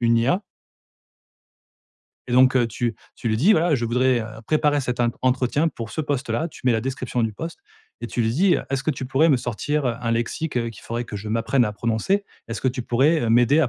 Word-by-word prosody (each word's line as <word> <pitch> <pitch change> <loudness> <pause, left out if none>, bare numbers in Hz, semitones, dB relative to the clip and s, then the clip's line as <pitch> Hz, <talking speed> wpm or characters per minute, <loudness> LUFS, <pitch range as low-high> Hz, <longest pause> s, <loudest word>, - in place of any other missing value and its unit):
une 115 -1 +3
IA 140 - +1 1.9
et - - -3
donc 130 +1 +5
heu, 120 -2 +3
tu 115 0 -2 0.2
tu 115 - -4
lui 110 - +1
dis: 180 - +5
«Voilà, 165 -1 +3
je 120 -3 -1
voudrais 125 +1 +2
heu, 110 - -5 0.2
préparer 150 -2 +2
cet 125 -1 -3
int 120 -1 +3
entretien 130 +5 +2
pour 115 -7 -7
ce 155 - -3
poste-là», 145 0 -1
tu - - -13
mets 125 - +4
la 115 - +1
description 125 -1 -2
du 110 -1 0
poste 165 +11 -7 0.4
et - - -4
tu 120 - -1
lui 110 - +1
dis 175 +9 +3
heu: - - -3
«Est-ce 135 -1 -1
que 155 - +2
tu 130 -2 -4
pourrais 145 +5 +3
me 140 - +5
sortir, 130 +5 -2
heu, 120 - 0
un 115 -1 -1
lexique, 120 +5 -2
heu, 115 -1 0
qu'il 110 - -14
faudrait 120 +1 -3
que 105 - -7
je 105 +2 -6
m'apprenne 115 +3 +2
à 105 - -2
prononcer? 115 - 0 0.2
Est-ce 115 - -4
que 130 - +1
tu 125 0 -3
pourrais, 140 +8 +2
heu, 115 - 0
m'aider 120 +6 +5
à 135 - +2
125 Hz, 240 wpm, -23 LUFS, 115-145 Hz, 1.9 s, donc